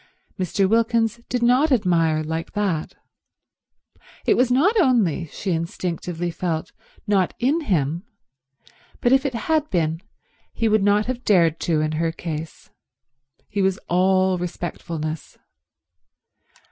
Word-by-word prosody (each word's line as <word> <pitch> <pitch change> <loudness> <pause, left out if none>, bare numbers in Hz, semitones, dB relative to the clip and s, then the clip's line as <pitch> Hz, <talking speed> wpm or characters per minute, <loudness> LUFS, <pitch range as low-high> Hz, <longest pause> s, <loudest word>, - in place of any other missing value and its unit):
Mr. 190 +1 +1
Wilkins 230 +1 +1
did 245 -1 -1
not 255 +6 +4
admire 165 -9 +2
like 160 +1 -4
that. 195 -7 -2 1.3
It - - +4
was 250 0 +2
not 305 - +3
only, 210 - +2
she 190 +5 -4
instinctively 170 +1 -3
felt, 165 -2 -3 0.3
not 195 -3 +1
in 280 +7 +1
him, 165 - 0 1.0
but 240 - +2
if 270 +1 +3
it 255 - -5
had 310 +5 0
been 165 -2 0 0.5
he 230 - 0
would 215 -1 +3
not 205 +1 +3
have 250 0 -4
dared 170 -5 +3
to 160 -3 +1
in 155 0 0
her 165 -1 +1
case. 160 -1 -7 0.8
He 200 -1 -2
was 190 -1 +2
all 185 +1 +3
respectfulness. 165 -3 -5
185 Hz, 125 wpm, -22 LUFS, 165-230 Hz, 1.3 s, not